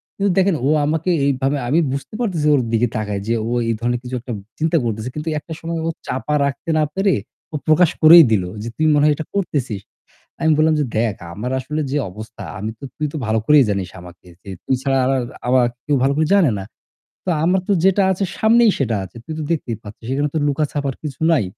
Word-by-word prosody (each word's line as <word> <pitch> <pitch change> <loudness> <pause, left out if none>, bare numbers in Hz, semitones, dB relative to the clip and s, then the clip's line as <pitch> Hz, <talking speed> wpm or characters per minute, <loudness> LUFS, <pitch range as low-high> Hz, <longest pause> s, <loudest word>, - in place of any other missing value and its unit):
কিন্তু 200 0 0
দেখেন 190 -2 +3
ও - - +2 0.2
আমাকে 160 +4 -1 0.2
এইভাবে 135 +1 0
আমি 155 +6 +3
বুঝতে 140 +8 -6
পারতেছি 170 -9 0
ওর 135 - +2
দিকে 115 +2 +3
তাকায় 105 -2 -3
যে 115 - +1
ও - - -3 0.2
এই - - +2
ধরনের 120 +1 -1
কিছু 125 +1 -5
একটা 120 -1 -6 0.3
চিন্তা 160 +2 +2
করতেছে। 110 +1 -3
কিন্তু 150 +1 -5
একটা 160 +2 -9
সময় 165 0 -3
ও - - +1 0.2
চাপা 150 +3 -2
রাখতে 140 +4 -4
না - - +3
পেরে 195 0 +2 0.4
ও - - -3
প্রকাশ 160 +2 +5
করেই 165 +2 +10
দিল 100 -4 +3 0.2
যে, - - -5
"তুই 155 - +1
মনে 145 0 +3
হয় 150 - +5
এটা 160 - -5
করতেছিস।" 135 - -2 0.6
আমি 160 - +2
বললাম 155 0 +4
যে, - - +2
"দেখ 110 -3 +1 0.2
আমার 115 +6 -4
আসলে 150 +4 -3
যে 145 - 0
অবস্থা, 110 +3 -10 0.2
আমি 105 +2 -3
তো - - -11
তুই 150 - -1
তো - - -5
ভালো 110 +1 +1
করেই 150 -2 +6
জানিস 95 -3 -2
আমাকে। 90 0 -14
যে 100 - -9
তুই 130 - +1
ছাড়া 135 -1 +1
আর 130 - +1
আর 130 - 0 0.3
আমাকে 125 -1 +4 0.2
কেউ 145 - +2
ভালো 135 - +3
করে 155 +1 +2
জানে 185 -9 +4
না। 95 - -6 0.6
তো 185 - -1
আমার 185 +3 +3
তো - - +3
যেটা 195 +1 +4
আছে 190 +2 -2
সামনেই 230 0 +5
সেটা 120 -5 0
আছে। 95 - -14
তুই 160 - -6
তো - - -3
দেখতেই 125 -8 -2
পাচ্ছিস। 105 +2 -11
এখানে 145 +2 0
তো 160 - +1
লুকাছাপার 145 -1 -1
কিছু 145 -1 -6
নাই। 145 -10 +3
145 Hz, 225 wpm, -20 LUFS, 120-160 Hz, 0.6 s, করেই